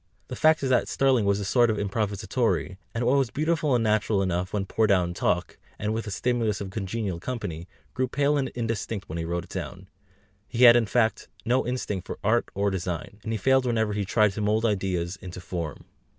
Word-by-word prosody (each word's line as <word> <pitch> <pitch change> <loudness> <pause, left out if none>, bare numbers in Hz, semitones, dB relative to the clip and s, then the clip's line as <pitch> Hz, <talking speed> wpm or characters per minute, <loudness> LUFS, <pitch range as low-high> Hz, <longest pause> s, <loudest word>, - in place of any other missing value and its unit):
The - - -4
fact 155 -1 +4
is 135 - 0
that 125 - +3
Sterling 130 -5 +2
was 100 0 +2
a 100 - -3
sort 120 +4 +3
of 110 - 0
improvisatore, 100 -2 -1
and 115 +1 -2
what 135 +3 +4
was 135 -4 +1
beautiful 155 0 +1
and 120 - +1
natural 105 -2 +2
enough 90 0 -1
when 100 -2 -1
poured 110 +2 +1
out 90 -3 +3
in 85 - -5
talk, 90 0 -1 0.2
and 105 +1 -2
with 115 0 -3
the - - -5
stimulus 115 -1 0
of 95 -2 -6
congenial 95 -2 -3
company, 90 -7 -5 0.3
grew 130 0 0
pale 145 +3 +1
and 135 -2 0
indistinct 115 -3 -3
when 80 +2 -5
he 80 - -3
wrote 85 +1 -2
it 90 - -16
down; 95 +1 -6 0.6
he 125 0 0
had, 120 -1 +10
in 120 -2 +3
fact, 110 +1 +1 0.2
no 125 +1 +1
instinct 105 -7 -3
for - - -5
art 115 +3 +2
or 100 +1 +1
for - - -4
design, 90 +1 -4
and 110 - -5
he 110 - 0
failed 130 +4 +3
whenever 110 -3 +1
he 105 0 -1
tried 105 +1 +3
to 100 - -5
mould 105 +2 +1
ideas 95 -4 -1
into 90 -1 -8
form. 85 -4 -5
105 Hz, 220 wpm, -26 LUFS, 95-120 Hz, 0.6 s, had